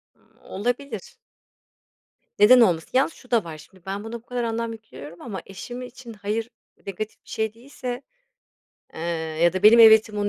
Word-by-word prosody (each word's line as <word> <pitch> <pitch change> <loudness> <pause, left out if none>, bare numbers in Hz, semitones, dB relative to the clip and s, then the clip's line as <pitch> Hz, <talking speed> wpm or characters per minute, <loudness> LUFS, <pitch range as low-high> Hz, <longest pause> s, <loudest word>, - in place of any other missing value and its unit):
M - - -31
olabilir. 245 +7 -4 1.2
Neden 245 +5 +8
olmasın? 170 -7 +2
Yalnız 270 +5 +2
şu 250 - -19
da 235 -3 +3
var; 160 -2 -8
şimdi 175 +4 -18
ben, 195 +2 -4
buna 225 +1 -8
bu 235 0 -7
kadar 245 -1 -3
anlam 230 0 -2
yüklüyorum 175 -8 -12
ama 200 -7 -6
eşim 240 +6 -8
için 250 -1 -10
hayır 215 +2 -3 0.4
negatif 205 +2 -6
bir - - -18
şey 220 -1 -2
değilse, 250 +1 -7 0.9
eee, - - -8 0.4
ya 175 - +5
da 185 0 -3
benim 215 +3 +8
evetim 220 -1 +7
onun 205 0 0
220 Hz, 170 wpm, -24 LUFS, 195-240 Hz, 1.2 s, Neden